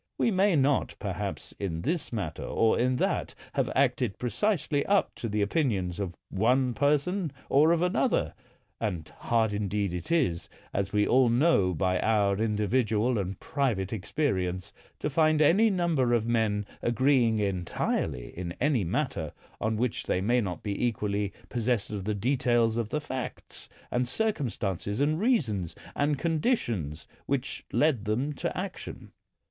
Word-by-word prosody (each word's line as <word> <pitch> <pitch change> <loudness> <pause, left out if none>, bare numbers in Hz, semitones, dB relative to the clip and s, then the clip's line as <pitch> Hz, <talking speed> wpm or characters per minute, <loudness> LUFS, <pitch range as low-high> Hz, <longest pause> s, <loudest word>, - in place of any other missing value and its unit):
We 230 - +2
may 195 -1 +3
not, 140 -1 +2
perhaps, - - -4
in 85 -5 -3
this 160 +3 -1
matter 95 -9 -3
or 115 -1 +2
in 125 +1 +2
that, - - -1 0.2
have - - 0
acted 125 -5 +1
precisely 145 - 0
up 200 0 +2
to 115 - -4
the 105 0 +1
opinions 100 - 0
of 90 -4 -3 0.2
one 125 +5 +2
person 150 +6 +1 0.2
or 150 +4 +5
of 170 0 +2
another 180 - +1 0.2
— - - -41
and 90 -8 -2
hard 115 -3 +1
indeed 100 -2 -1
it 90 - -5
is, 130 - +1 0.2
as 100 0 -1
we 105 -1 +3
all 130 -1 +4
know 115 - +3
by 90 +3 +1
our 100 -3 +2
individual 110 +1 +1
and 95 -1 -4
private 115 -9 -1
ex 100 -3 -6
perience, 95 - -1 0.3
to - - -2
find 155 +1 +3
any 190 +9 +5
number 165 - +2
of 115 -2 0
men 110 -3 +1 0.2
agreeing 120 -2 +3
entirely 90 - -2
in 85 -1 -4
any 140 -6 +2
matter, 85 - -2 0.3
on 110 0 0
which 125 0 -1
they - - +1
may 120 +6 +2
not 90 -6 -4
be 100 +2 -2
equally 105 -4 0 0.2
possessed 120 -3 -1
of 100 -3 -4
the 105 0 0
details 120 0 +2
of 115 -2 -1
the 150 - -1
facts, 130 -3 -6 0.2
and 125 0 +1
circumstances, 120 - -2
and 155 +3 +2
reasons, 120 - +1 0.2
and 145 0 +1
conditions 125 - -1 0.2
which 135 -1 -2
led 140 -8 +2
them 125 +8 0
to - - -3
action. - - -6
115 Hz, 155 wpm, -28 LUFS, 100-145 Hz, 0.3 s, or